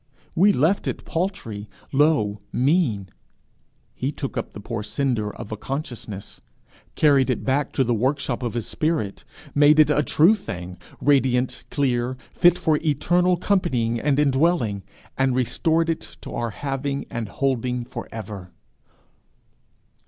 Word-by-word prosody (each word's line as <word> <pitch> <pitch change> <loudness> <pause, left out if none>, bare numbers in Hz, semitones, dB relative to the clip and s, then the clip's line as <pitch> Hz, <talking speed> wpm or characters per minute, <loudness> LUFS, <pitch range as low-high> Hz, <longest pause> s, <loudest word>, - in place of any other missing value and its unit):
We 200 +5 +5
left 165 +5 +1
it - - -4
paltry, 160 - -3 0.2
low, 135 -8 +2
mean; 125 - +1 0.8
he 135 +3 -2
took 140 -2 -5
up 115 - -4
the - - -8
poor 110 +1 -4
cinder 115 -3 -1
of 105 - -8
a 110 - -3
consciousness, 115 -5 -6 0.5
carried 140 -3 +4
it 125 - -1
back 135 +2 0
to 135 - +2
the 120 -1 +1
workshop 130 +2 0
of 120 -2 -3
his 120 - -2
spirit, 155 -11 -1 0.3
made 145 +1 +5
it 150 -1 +6
a 150 - +3
true 160 +6 +5
thing, 90 - -6 0.2
radiant, 130 -3 +2
clear, 125 -2 0 0.2
fit 175 0 +5
for 155 -3 +2
eternal 175 +4 +2
companying 130 - +1
and 145 +2 +1
indwelling, 135 - +2 0.4
and 135 -1 +2
restored 160 +6 +1
it 165 -1 -4
to - - -8
our 120 -1 -2
having 140 +3 -3
and 115 -3 -4
holding 125 -2 -1
for 120 -1 -7
ever! 105 -5 -7
130 Hz, 140 wpm, -23 LUFS, 115-150 Hz, 0.8 s, it